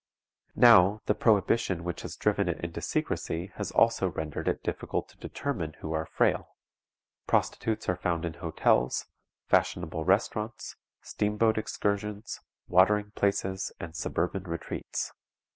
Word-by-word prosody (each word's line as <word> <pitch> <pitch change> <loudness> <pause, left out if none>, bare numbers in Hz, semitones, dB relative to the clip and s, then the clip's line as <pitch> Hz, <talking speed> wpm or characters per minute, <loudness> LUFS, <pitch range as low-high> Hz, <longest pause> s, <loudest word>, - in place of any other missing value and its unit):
Now, 105 -4 +7
the - - +3
prohibition 105 -4 +2
which 85 0 -4
has - - -7
driven 100 -3 +1
it 80 - -2
into 85 0 -5
secrecy 85 +4 -2
has 105 -3 -3
also 115 -4 +3
rendered 80 -2 -4
it - - 0
difficult - - -3
to - - -21
determine 85 - -4
who 80 +1 -6
are 80 0 -2
frail. - - 0 0.7
Prostitutes 110 -1 0
are 90 - +2
found 85 -2 -1
in 85 - -3
hotels, 80 -6 +1 0.4
fashionable 80 -2 +1
restaurants, 105 +4 0 0.3
steam 105 0 -2
boat 110 0 +3
excursions, 105 0 -3 0.3
watering 105 +3 +4
places, 95 -2 -1
and 85 -1 -7
suburban 90 +3 -2
retreats. 85 -2 -4
95 Hz, 130 wpm, -29 LUFS, 85-105 Hz, 0.7 s, Now